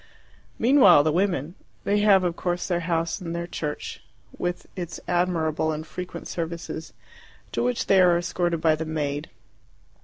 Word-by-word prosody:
Meanwhile 225 - +6
the 155 - +2
women 170 -3 0 0.3
they 205 +1 +2
have, 200 -2 +5
of 175 -2 0
course, 175 -1 -2
their 175 -2 0
house 170 +2 -1
and 170 -1 -4
their 170 0 -3
church, 150 -3 -5 0.3
with 175 0 -3
its 175 -4 -5
admirable 165 -3 +1
and 155 0 -4
frequent 180 +2 -7
services, 165 -1 -5 0.6
to - - -1
which 245 0 0
they 195 -1 +5
are 175 -1 +5
escorted 175 -1 -1
by 160 -1 +4
the 160 +1 -3
maid. 150 -1 -3
170 Hz, 155 wpm, -25 LUFS, 160-180 Hz, 0.6 s, Meanwhile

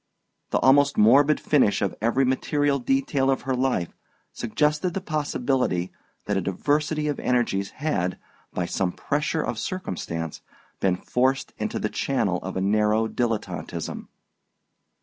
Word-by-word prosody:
The - - +1
almost 140 +1 +4
morbid 140 +8 +5
finish 135 -9 +3
of 100 - 0
every 120 +4 +2
material 140 +2 +1
detail 135 +1 +1
of 135 - +1
her 135 -1 -1
life 125 -9 -1 0.4
suggested 150 +8 0
the - - 0
possibility 135 - -1 0.3
that 105 - -1
a - - +1
diversity 150 - 0
of 145 - -2
energies 115 -6 0
had, 95 - -2 0.3
by 90 - -2
some 90 0 -1
pressure 150 +2 -1
of 120 -3 -3
circumstance, 85 - -4 0.4
been 95 -2 +2
forced 130 +8 0
into - - -2
the - - -1
channel - - 0
of - - -5
a - - 0
narrow 105 +2 +2
dilettanteism. 115 -1 -3
130 Hz, 135 wpm, -25 LUFS, 105-145 Hz, 0.4 s, morbid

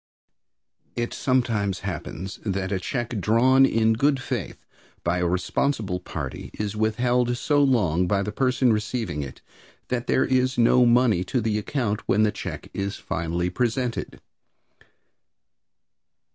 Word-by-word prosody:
It 120 0 -2
sometimes 110 -7 0
happens 95 +3 -5
that 95 -2 -2
a 95 - 0
check 120 +2 -3
drawn 130 +6 +5
in 110 -2 +2
good 140 +4 +2
faith 125 - -5 0.4
by 85 +1 0
a 90 - +1
responsible 95 +2 -1
party 90 - -6
is 105 0 -3
withheld 120 +3 +1
so 145 +3 +2
long 90 - +2
by 100 +1 +1
the 105 - -3
person 130 -1 +2
receiving 105 -7 -2
it 70 -2 -8 0.5
that 125 -1 -2
there - - +3
is 130 0 +1
no 120 +1 +5
money 120 -6 +4
to 125 - 0
the 110 -2 0
account 110 -1 -2
when 105 +2 +3
the 105 - +3
check 100 - -7
is 100 +1 -3
finally 85 +2 -2
presented. 120 +3 -2
110 Hz, 135 wpm, -24 LUFS, 95-125 Hz, 0.5 s, drawn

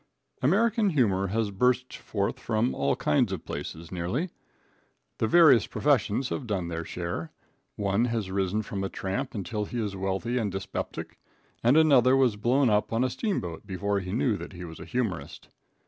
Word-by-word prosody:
American 210 - +3
humor 100 - +2
has 105 +1 -1
burst 125 +5 +1
forth 100 -2 -2
from 115 +2 0
all 70 0 +1
kinds 75 - +2
of - - -5
places, 80 +1 -6
nearly. 95 - -2 0.9
The 110 - +2
various 140 - +6
professions 135 -3 +1
have 125 - -4
done 95 -5 -2
their 85 0 -3
share. 85 -1 -4 0.4
One 100 +3 +1
has 115 -5 -2
risen 100 +2 0
from 100 -3 -4
a 95 - -2
tramp 120 +8 -3
until 105 +1 -3
he 120 - -4
is 105 -3 -2
wealthy 95 +6 -1
and 105 -4 -1
dyspeptic, 95 0 -5 0.4
and 125 +6 +5
another 135 -5 +6
was 130 -5 +3
blown 125 +6 +2
up 105 -1 +2
on 115 +2 +1
a 130 - 0
steamboat 100 - -3
before 100 +1 -1
he 90 -1 -6
knew 115 0 +1
that - - -8
he 90 0 -7
was 80 -1 -10
a - - -8
humorist. 115 -9 -3
105 Hz, 175 wpm, -27 LUFS, 95-125 Hz, 0.9 s, various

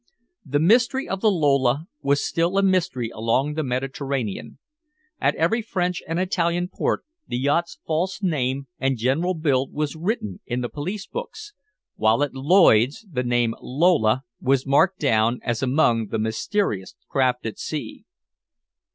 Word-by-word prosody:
The 145 -2 -1
mystery 235 - +3
of 195 0 -3
the 220 - +4
Lola 140 -5 +2 0.2
was 140 0 +1
still 170 +3 0
a 195 - +3
mystery 185 -11 +1
along 115 +7 0
the 155 - -1
Mediterranean. 135 -3 -3 0.6
At - - +2
every 195 +9 +1
French 180 -4 -2
and 165 +2 -1
Italian 175 -1 0
port - - -1 0.2
the 120 - -2
yacht's 145 +6 0
false 170 +4 -1
name 135 -6 0
and 135 0 0
general 145 +11 0
build 140 -5 0
was 150 -1 -2
written 160 - -3
in 125 0 -2
the 120 - -3
police 185 +7 -5
books, 445 -3 -7 0.4
while 110 +5 +3
at 145 - -2
Lloyd's 140 - +4
the 125 -4 -1
name 120 -2 +1
Lola 130 -5 +2 0.2
was 135 0 +2
marked 170 +7 +3
down 115 - +2
as 120 -2 -1
among 125 -4 +2
the 110 - -2
mysterious 110 - -1
craft 130 -3 0
at 110 - -5
sea. 145 -8 -5
145 Hz, 150 wpm, -23 LUFS, 125-175 Hz, 0.6 s, the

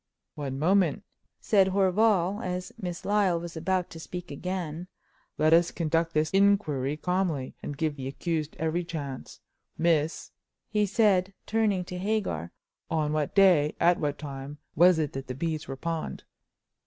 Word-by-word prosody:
"One 135 -3 -4
moment," 185 +4 +2 0.4
said 195 -3 +3
Horval, 195 +1 +2
as 180 0 -3
Miss 175 -2 -5
Lyle 200 -4 +2
was 170 0 -7
about 180 +2 -1
to 165 - -9
speak 175 0 -7
again, 175 +1 -4 0.5
"let 155 +1 +4
us 170 +1 +5
conduct 165 0 -1
this 155 +1 +2
inquiry 170 -9 +2
calmly, 180 -6 -1
and 145 - -6
give 155 -2 -1
the 130 -1 -5
accused 155 +2 -3
every 160 +2 -1
chance 145 -6 -7 0.4
Miss," 160 -1 +1 0.4
he 210 -1 +1
said, 195 -3 +2
turning 210 -4 +1
to 180 0 -6
Hagar, 190 - -1 0.4
"on 155 -2 0
what 155 -2 -1
day, 180 -7 +5
at 175 +1 +4
what 145 -1 -1
time, 140 -1 -7 0.2
was 175 +2 +6
it 155 -3 -1
that 135 0 -6
the 125 - -5
beads 155 +2 -3
were 135 - -5
pawned?" 165 +2 -4
170 Hz, 155 wpm, -28 LUFS, 150-185 Hz, 0.5 s, was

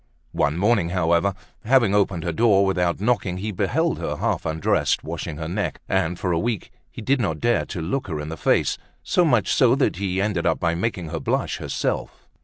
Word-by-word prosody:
One 75 +3 0
morning, 100 -3 +2
however, 85 +2 +1 0.3
having 120 -3 +3
opened 100 -4 +1
her 85 - -1
door 100 +1 +4
without 90 -3 0
knocking, 105 -4 0
he 105 +3 -3
beheld 120 - 0
her - - -3
half - - -1
undressed, 80 -1 +1
washing 75 - -5
her 80 +1 -4
neck; 90 -2 -2
and, 90 -2 0
for 90 - -2
a 85 - +1
week, 115 -2 -2 0.2
he - - -9
did 135 +2 +2
not 80 -8 -1
dare 120 +6 +1
to 85 - -5
look 125 +10 -2
her 80 -5 -3
in 75 +1 -5
the 80 - -4
face, - - +1 0.2
so 180 - +2
much 120 - +2
so 125 -1 +4
that 135 -10 +1
he 95 -1 -1
ended 95 -4 0
by 85 -1 +1
making 90 -2 -2
her - - -3
blush - - -1
herself. - - -3
95 Hz, 205 wpm, -23 LUFS, 85-110 Hz, 0.3 s, door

